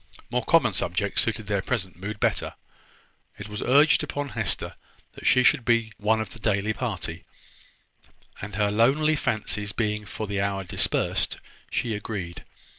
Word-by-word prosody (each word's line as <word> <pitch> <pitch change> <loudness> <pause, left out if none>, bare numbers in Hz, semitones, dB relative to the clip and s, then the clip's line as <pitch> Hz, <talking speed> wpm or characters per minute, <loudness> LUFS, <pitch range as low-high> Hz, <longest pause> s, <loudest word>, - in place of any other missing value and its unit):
More 125 -1 0
common 130 -6 +4
subjects 90 +3 0
suited 110 -1 -1
their 100 -1 0
present 95 -5 -2
mood 100 +3 -6
better. - - 0 0.8
It 105 - -7
was 105 0 -5
urged 145 +3 +5
upon 145 0 -3
Hester - - -1 0.4
that - - -5
she 125 -1 +5
should 130 0 +4
be 115 -1 +2
one 110 +1 +2
of 110 - -4
the 120 - -9
daily 105 -1 +1
party; 95 -9 -4 1.2
and, 100 0 -6
her 105 0 +2
lonely 140 +9 +3
fancies 105 -5 -1
being 105 -2 -1
for 110 - -4
the 100 -1 -1
hour 100 -1 -1
dispersed, 90 - 0 0.3
she 115 - -1
agreed. 100 -5 -5
105 Hz, 155 wpm, -26 LUFS, 100-120 Hz, 1.2 s, urged